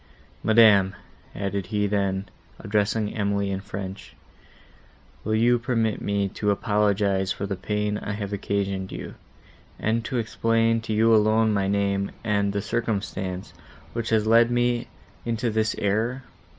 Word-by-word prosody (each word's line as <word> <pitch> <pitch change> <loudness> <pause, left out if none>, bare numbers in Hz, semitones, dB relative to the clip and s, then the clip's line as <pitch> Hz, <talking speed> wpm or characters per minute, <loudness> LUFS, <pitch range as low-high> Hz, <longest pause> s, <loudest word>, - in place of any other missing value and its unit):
Madam," 105 -4 +5 0.4
added 100 -1 -3
he 105 +1 0
then, 100 -1 0 0.3
addressing 105 0 0
Emily 100 -2 0
in 95 - -2
French, 95 -1 -7 1.1
"will 110 +1 0
you 120 +2 +3
permit 115 -3 0
me 100 -1 0
to 105 +1 -2
apologise 100 -2 +1
for 95 - -3
the 100 0 -3
pain 105 +2 -2
I 100 - -4
have 100 -1 -4
occasioned 100 -1 -2
you, - - -7 0.6
and 115 +1 0
to 125 - -2
explain 115 0 +1
to 110 -1 -3
you 115 +1 +4
alone 110 0 +4
my 100 -1 +1
name, 100 0 0
and 100 -2 +1
the 100 0 -2
circumstance, 100 -5 -3 0.4
which 115 -1 -3
has 110 -1 +2
led 115 +1 +5
me 120 0 +1 0.4
into 115 0 -1
this 110 0 0
error? 115 +6 0
105 Hz, 140 wpm, -25 LUFS, 100-115 Hz, 1.1 s, Madam